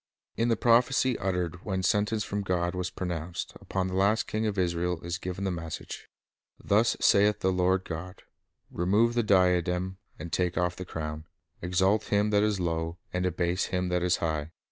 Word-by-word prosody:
In 115 - +1
the 115 -2 +2
prophecy 125 +2 +3
uttered 90 -2 -2
when 95 -2 -2
sentence 105 +2 +1
from 105 0 -3
God 90 -2 -1
was 90 0 -2
pronounced 85 -2 -4
upon 95 -1 -2
the 95 - -4
last 100 +4 +2
king 110 +1 -1
of 100 -2 -2
Israel 90 -1 0
is 85 +1 -4
given 90 +1 -5
the 95 - 0
message: 80 -2 -6 0.3
— - - -53
"Thus 110 +3 +2
saith 105 +1 +4
the 95 - +2
Lord 90 +1 +2
God: 90 +3 -7 0.5
Remove 105 +7 +2
the 120 - +2
diadem, 90 -2 +2 0.2
and 85 - -8
take 90 -2 0
off 90 +1 +1
the 90 - -7
crown;. 80 -2 -5 0.4
exalt 95 +4 +2
him 105 +1 +1
that 105 -1 +4
is 105 -2 +1
low, 85 -1 -2 0.2
and 90 0 0
abase 90 +1 0
him 90 -1 -1
that 90 0 +1
is 90 0 +2
high. 80 -2 -2
90 Hz, 185 wpm, -28 LUFS, 90-100 Hz, 0.5 s, saith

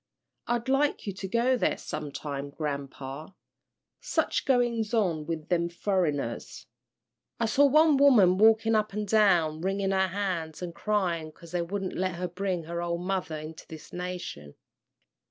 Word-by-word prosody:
I'd 240 0 -1
like 275 +2 +1
you 200 - -3
to 190 +1 -6
go 235 +6 +2
there 245 - +1
sometime, 145 -1 -5
grampa. 140 +2 -6 0.6
Such - - -1
goings 240 -4 +1
on 170 -9 0
with 160 -1 -4
them 170 -1 +1
furriners! 170 - -2 0.7
I 230 - +2
saw 280 +6 +4
one 305 +1 +5
woman 215 -10 +6
walkin' 225 +1 +5
up 215 -2 +1
and 210 0 -3
down 180 -7 +3
wringin' 195 +1 0
her 190 0 +2
hands 180 -4 -3
an' 170 -1 -5
cryin' 175 -6 -1
'cause 170 +1 -15
they 175 -1 0
wouldn't 190 +2 -3
let 185 -1 -1
her 180 +1 -3
bring 180 -1 -2
her 170 +2 -4
ole 170 0 -1
mother 180 -3 -2
into 155 +1 -9
this 160 -1 -11
nation." 175 - -6
180 Hz, 155 wpm, -28 LUFS, 160-210 Hz, 0.7 s, woman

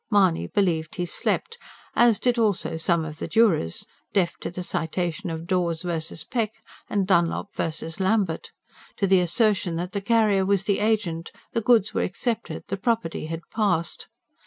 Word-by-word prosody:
Mahony 190 -6 +3
believed 170 -6 0
he 180 - -1
slept, 460 - -1 0.4
as 235 -3 +5
did 245 -1 +1
also 210 -7 +1
some 160 0 +1
of 155 0 -7
the - - -3
jurors, 190 - +2 0.3
deaf 180 -4 +2
to - - -5
the 180 +1 -5
Citation 175 +3 -2
of 165 0 -5
Dawes 170 -2 0
V. 165 -3 -3 0.2
Peck 220 -3 0 0.3
and 200 -2 +1
Dunlop 185 +1 +1
V. - - 0 0.3
Lambert; 190 -3 +1 0.5
to 200 - +2
the 190 -1 +5
assertion 185 -1 +2
that 175 +2 -3
the 200 - -2
carrier 215 -2 +3
was 195 0 +2
the 200 -1 +1
agent, 205 -6 0 0.2
the 230 - +1
goods 225 -2 +3
were - - +1
accepted, 230 +4 -2
the 195 - -2
property 200 -7 -1
had 165 +1 -4
"passed." 195 -7 0
190 Hz, 165 wpm, -25 LUFS, 170-215 Hz, 0.5 s, as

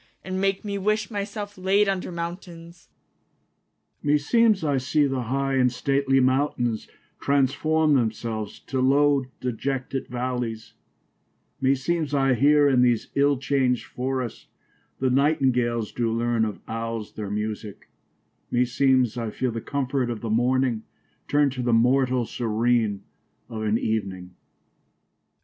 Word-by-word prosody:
And 185 0 -3
make 195 +1 0
me 200 -1 -3
wish 215 +3 0
my 205 -2 -2
selfe 205 0 -7
layd 195 +2 +3
under 190 -2 -2
mountaines. 170 0 -8 1.1
Strephon. - - -7
Me 150 - +5
seemes 215 +5 +3
I 145 -3 +1
see 145 +3 +2
the 135 -2 -1
high 135 +3 -1
and 125 -1 +3
stately 135 +1 +1
mountaines, 130 -4 0 0.3
Trans 140 -2 +2
for 160 +1 +1
me 150 - +4
themselves 110 -2 -3
to 130 -1 -3
lowe 140 +1 +3 0.2
de 125 - -1
jetted 135 +2 -3
v 125 - -7
allies: 120 -3 -3 0.9
Me 135 +1 +3
seemes 150 +1 -1
I 135 -1 +3
heare 145 +4 +4
in 130 -3 +4
these 120 -2 +2
ill 140 0 +3
changed 130 -2 0
forrests, 130 -2 -4 0.5
The 130 -1 0
Nightingales 125 -5 +1
doo 115 -2 -1
learne 115 0 +1
of 105 -2 -5
Owles 115 -1 -4
their 105 -2 -5
musique: 105 0 -5 0.6
Me 125 +1 +2
seemes 125 -2 +2
I 115 -1 -3
feele 125 +3 -2
the 115 - -4
comfort 135 -2 -1
of 115 -3 -4
the 115 - -3
morning 125 0 +1 0.5
Turnde 145 -1 +3
to 130 -1 -4
the 120 -1 +1
mortall 125 +1 +3
serene 115 -2 0 0.5
of 110 -2 -5
an 110 0 +1
evening. 95 -5 -3
130 Hz, 150 wpm, -25 LUFS, 115-145 Hz, 1.1 s, Me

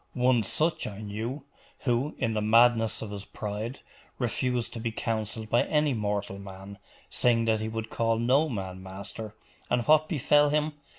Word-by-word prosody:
One 125 -1 +3
such 155 - +1
I 100 -1 -7
knew, 110 +7 -4 0.4
who, 130 +3 0
in 115 - 0
the 105 - 0
madness? 115 +1 +4
of 105 - -6
his 100 -1 -6
pride, 105 +5 -5 0.4
refused 125 0 -1
to 115 - -5
be 115 0 -2
counselled 110 -1 -3
by 120 - +5
any 150 -2 +2
mortal 105 -3 -2
man 100 +1 -10 0.3
saying 115 -2 +3
that 110 -1 +2
he 110 +1 -3
would 115 0 -5
call 115 -1 +1
no 130 +7 +3
man 95 -4 -5
master: 100 +3 -8 0.3
and 120 - +2
what 155 +3 +4
befell 145 -1 +4
him? 150 +1 +1
115 Hz, 170 wpm, -28 LUFS, 105-125 Hz, 0.4 s, by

